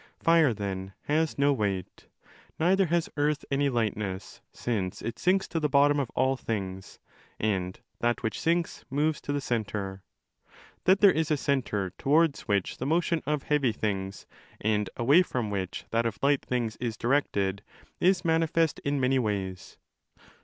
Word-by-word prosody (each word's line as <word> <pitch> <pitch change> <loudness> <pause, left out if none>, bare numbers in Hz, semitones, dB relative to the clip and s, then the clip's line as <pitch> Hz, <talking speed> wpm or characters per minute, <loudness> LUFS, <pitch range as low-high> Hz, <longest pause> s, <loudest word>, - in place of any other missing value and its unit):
Fire, 165 -5 +4
then, 95 -3 -4
has 155 +1 0
no 140 0 +4
weight. 100 -7 -3 0.5
Neither 185 +3 +3
has 170 0 +1
earth 145 0 0
any 140 +1 +2
lightness, 105 -5 -3
since 100 -7 -3
it 115 - -4
sinks 190 +2 +2
to 165 - -1
the 150 -1 0
bottom 145 +1 +4
of 135 -4 -1
all 130 +1 +2
things, 95 -6 -5 0.4
and 95 -4 -1 0.2
that 120 +1 0
which 110 - -2
sinks 170 +1 0
moves 150 +3 0
tothe 145 -1 -2
centre. 100 -5 -3 0.8
That 190 +1 +4
there 200 -2 +7
isa 160 -1 +1
centre® 125 -10 -1
towards 155 0 +2
which 100 -3 +1
30 - - -12
the 125 - -3
motion 170 +1 +1
of 150 -2 0
heavy 145 -5 +2
things, 95 -3 -3 0.3
and 105 -1 0
away 140 +9 +5
from 125 - -2
which 95 -2 -4
that 115 +1 +2
of 110 - -4
light 140 0 +3
things 120 -3 -2
is 115 -3 -3
directed, 100 -7 0 0.4
is 180 0 +3
manifest 165 -1 +2
in 140 0 -1
many 130 +1 +2
ways. 100 -5 -3
130 Hz, 155 wpm, -28 LUFS, 105-150 Hz, 0.8 s, there